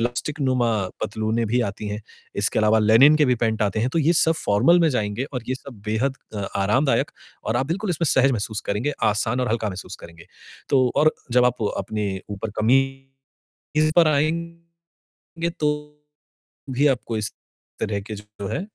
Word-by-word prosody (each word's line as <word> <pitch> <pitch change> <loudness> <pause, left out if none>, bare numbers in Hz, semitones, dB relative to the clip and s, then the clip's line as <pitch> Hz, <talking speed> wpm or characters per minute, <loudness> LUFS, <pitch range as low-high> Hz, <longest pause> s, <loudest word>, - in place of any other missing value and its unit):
Elastic 125 +6 -2
नुमा 130 -3 +2 0.3
पतलूनें 110 +2 -1
भी 120 +4 +1
आती 100 +1 -7
हैं। 105 +1 -4 0.4
इसके - - +2
अलावा 110 +1 +4
लिनेन 115 +8 +6
के 155 - +4
भी 125 - +3
पैंट 110 -2 0
आते 105 0 0
हैं 125 - +1
तो 165 - 0
ये 160 +2 +3
सब 160 -1 +4
फ़ॉर्मल 105 +13 +4
में 165 - +4
जाएँगे 110 -1 -1
और 125 -3 -3
ये 130 - 0
सब 130 -5 -11
बेहद 125 +6 0 0.2
अ, 105 - -3 0.2
आरामदायक 125 +9 +2 0.3
और 110 - 0
आप 130 +2 0
बिल्कुल 190 +6 -2
इसमें 170 -1 0
सहज 135 -1 +4
महसूस 110 -2 -2
करेंगे, 105 +9 0
आसान 110 +3 +1
और 125 - 0
हल्का 110 -1 0
महसूस 95 0 -7
करेंगे। 85 -1 -13 0.4
तो 130 -2 +3
और 155 +1 +5 0.2
जब 125 0 +5
आप 125 -2 +1 0.2
अपने 105 -2 -2 0.2
ऊपर 105 +2 -4
कमीज़ 135 +3 -1 0.5
पर 170 -2 +6
आएँगे 170 +2 -3 0.6
तो 150 - +2 1.0
भी 135 +3 +3
आपको 120 -4 -1
इस 105 - -2 0.5
तरह 100 -1 -1
के 110 +2 -7
जो 105 -1 -9
है 175 - -2
125 Hz, 175 wpm, -23 LUFS, 105-140 Hz, 1.0 s, लिनेन